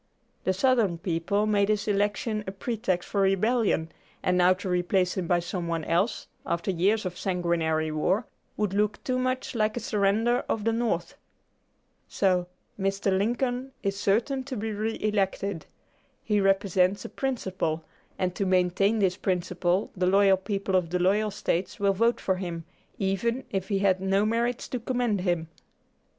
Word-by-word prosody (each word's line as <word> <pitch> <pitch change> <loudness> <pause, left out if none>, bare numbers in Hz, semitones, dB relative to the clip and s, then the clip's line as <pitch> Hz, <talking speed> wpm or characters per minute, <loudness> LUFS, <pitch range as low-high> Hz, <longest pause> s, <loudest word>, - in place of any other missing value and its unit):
The 190 - +2
Southern 220 -4 +2
people 170 +4 0
made 205 -1 +2
his 210 -1 0
election 210 +1 0
a - - -2
pretext 195 -3 -2
for 200 - 0
rebellion, 195 -3 +2 0.3
and 180 - +2
now 180 0 +5
to 195 +1 -7
replace 180 0 +1
him 185 -3 -2
by 175 - +3
some 175 0 -3
one 165 -1 -2
else, 175 +9 0 0.2
after 170 +3 -1
years 195 +5 +1
of 180 -1 -4
sanguinary 165 -4 0
war, 185 +9 +1 0.3
would 210 -3 0
look 210 +1 0
too 255 -1 0
much 255 0 -1
like 215 -1 0
a - - 0
surrender 220 +3 +1
of 215 - -1
the 225 +1 +1
North. 220 -8 -1 0.9
So, 180 -3 +1 0.3
Mr. 195 0 0
Lincoln 245 +5 -1
is 195 0 0
certain 230 +7 +1
to 260 -2 -5
be 220 +1 -3
re 215 +2 -2
elected. 200 -4 -1 0.6
He 210 -2 +1
represents 195 -1 +2
a - - -2
principle, 185 - -2 0.3
and 180 -1 -1
to 200 - -2
maintain 185 +3 +2
this 190 -3 +1
principle 180 0 0
the 180 -1 +1
loyal 195 0 +5
people 195 0 -2
of 180 -3 +2
the 180 - 0
loyal 200 +4 +2
States 185 -3 -2
will 200 -1 +3
vote 230 +5 +2
for 190 -1 0
him, 170 -3 -5 0.3
even 220 +6 0
if 190 -1 -2
he 200 - +1
had 190 -1 +2
no 195 +2 +2
merits 235 +2 0
to 250 - -2
commend 240 -4 0
him." 175 -3 -1
195 Hz, 165 wpm, -27 LUFS, 180-215 Hz, 0.9 s, now